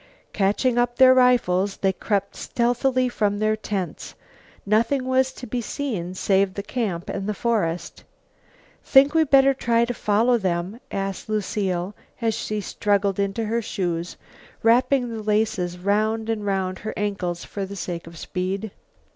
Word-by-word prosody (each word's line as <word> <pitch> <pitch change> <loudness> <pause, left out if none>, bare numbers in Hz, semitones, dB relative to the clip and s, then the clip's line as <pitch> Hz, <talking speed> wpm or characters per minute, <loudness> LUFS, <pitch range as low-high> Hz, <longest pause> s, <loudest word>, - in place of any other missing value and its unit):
Catching 215 +5 +1
up 240 0 +1
their 260 0 +7
rifles 205 -7 +3
they 195 -1 +1
crept 200 +1 -2
stealthily 250 +2 +1
from 210 -4 0
their 215 +1 +1
tents. 205 -4 -5 0.5
Nothing 230 +6 +2
was 260 0 +2
to 255 - -9
be 245 +1 -3
seen 215 - -4
save 195 0 +1
the 200 - -4
camp 200 -7 -3
and 200 +1 -3
the 210 - -1
forest. 180 -8 -1 0.8
"Think 275 +2 +5
we 320 -1 +4
better 275 -1 +5
try 235 -3 +1
to 245 - -3
follow 230 +3 +2
them?" 185 +3 -2
asked 195 +1 -4
Lucile, 195 -3 -1 0.3
as 225 -2 +1
she 215 -1 -3
struggled 200 0 0
into 200 +3 -1
her 230 +2 0
shoes, 175 -5 -3 0.5
wrapping 250 +3 +3
the 220 - -5
laces 210 -4 0
round 215 +4 0
and 210 -2 -3
round 190 -1 -1
her 215 - -5
ankles 190 -4 -2
for 200 - -5
the 200 - -8
sake 175 -3 -5
of 165 0 -11
speed. 190 +5 -3
210 Hz, 155 wpm, -23 LUFS, 195-240 Hz, 0.8 s, their